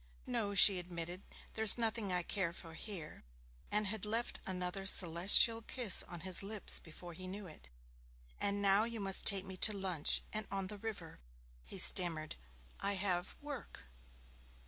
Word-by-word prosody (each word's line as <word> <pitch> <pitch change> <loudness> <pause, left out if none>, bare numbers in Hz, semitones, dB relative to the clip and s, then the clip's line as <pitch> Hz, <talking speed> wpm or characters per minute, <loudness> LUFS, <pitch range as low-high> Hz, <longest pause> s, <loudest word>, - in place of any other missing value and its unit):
'No,' 225 -5 -4
she 195 0 +7
admitted; 175 +1 -8 0.3
'there's 220 0 +6
nothing 225 -3 -2
I 180 -1 -2
care 180 -2 -3
for 165 -1 -13
here,' 165 -3 -9 0.5
and 210 0 -1
had 205 0 -5
left 225 +3 -3
another 185 +1 -5
celestial 190 +6 +5
kiss 230 -2 +2
on 175 -2 -10
his 185 +1 +7
lips 205 +1 -2
before 175 +2 -13
he 185 +3 -10
knew 200 +2 -9
it. 155 - -15 0.7
'And 200 0 -2
now 200 +1 +3
you 230 0 -6
must 195 -2 +1
take 195 -1 +4
me 190 -1 -9
to 210 +2 +2
lunch 185 -6 -1
and 215 -1 -4
on 195 -1 -4
the 205 - -12
river.' 200 -7 -9 0.4
He - - -8
stammered, 160 -4 +1 0.4
'I 200 - -2
have 185 -2 -4
work.' 285 - -10
195 Hz, 160 wpm, -33 LUFS, 180-210 Hz, 0.7 s, she